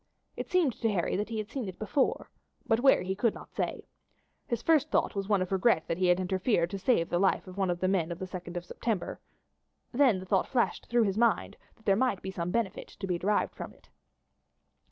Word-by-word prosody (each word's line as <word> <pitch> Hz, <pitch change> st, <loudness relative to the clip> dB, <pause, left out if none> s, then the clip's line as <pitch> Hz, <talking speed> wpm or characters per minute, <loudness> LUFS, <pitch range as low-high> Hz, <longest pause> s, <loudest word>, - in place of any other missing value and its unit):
It -, -, -5 dB
seemed 350 Hz, -, +3 dB
to 225 Hz, -, +2 dB
Harry 180 Hz, -4 st, 0 dB
that 210 Hz, +2 st, -2 dB
he 225 Hz, -, -3 dB
had 215 Hz, 0 st, -4 dB
seen 260 Hz, -6 st, -3 dB
it 185 Hz, -, -9 dB
before, 220 Hz, +6 st, 0 dB, 0.3 s
but 225 Hz, -, +2 dB
where 270 Hz, +2 st, +5 dB
he 190 Hz, +1 st, -1 dB
could 210 Hz, +3 st, +1 dB
not -, -, -12 dB
say. -, -, -3 dB, 0.6 s
His 235 Hz, -, -2 dB
first 310 Hz, -2 st, +3 dB
thought -, -, +1 dB
was 195 Hz, 0 st, -3 dB
one 200 Hz, -3 st, +3 dB
of 185 Hz, -, -8 dB
regret 190 Hz, -3 st, +2 dB
that 165 Hz, -, -2 dB
he 185 Hz, -, +3 dB
had 180 Hz, +1 st, +4 dB
interfered 185 Hz, -1 st, +1 dB
to 195 Hz, -, -4 dB
save 190 Hz, -5 st, +1 dB
one 190 Hz, +1 st, +1 dB
of 175 Hz, -1 st, -1 dB
the 185 Hz, -, +1 dB
men 180 Hz, -3 st, +1 dB
of 170 Hz, -, -4 dB
the 190 Hz, -, -5 dB
2d 180 Hz, -1 st, -7 dB
of 175 Hz, -, -5 dB
September; 215 Hz, +1 st, -3 dB, 0.7 s
then 255 Hz, -5 st, +4 dB
the 185 Hz, -, -7 dB
thought 190 Hz, 0 st, +1 dB
flashed 245 Hz, -3 st, 0 dB
through 240 Hz, -1 st, +3 dB
his 200 Hz, 0 st, 0 dB
mind 230 Hz, -6 st, +2 dB, 0.2 s
that 220 Hz, -, -27 dB
there 195 Hz, -, +4 dB
might 245 Hz, -4 st, 0 dB
be 190 Hz, -, -4 dB
some 170 Hz, -2 st, -3 dB
benefit 205 Hz, -1 st, -2 dB
to 195 Hz, -, -8 dB
be 180 Hz, -2 st, -1 dB
derived 205 Hz, +3 st, +1 dB
from -, -, -8 dB
it. -, -, -25 dB
195 Hz, 225 wpm, -29 LUFS, 185-230 Hz, 0.7 s, where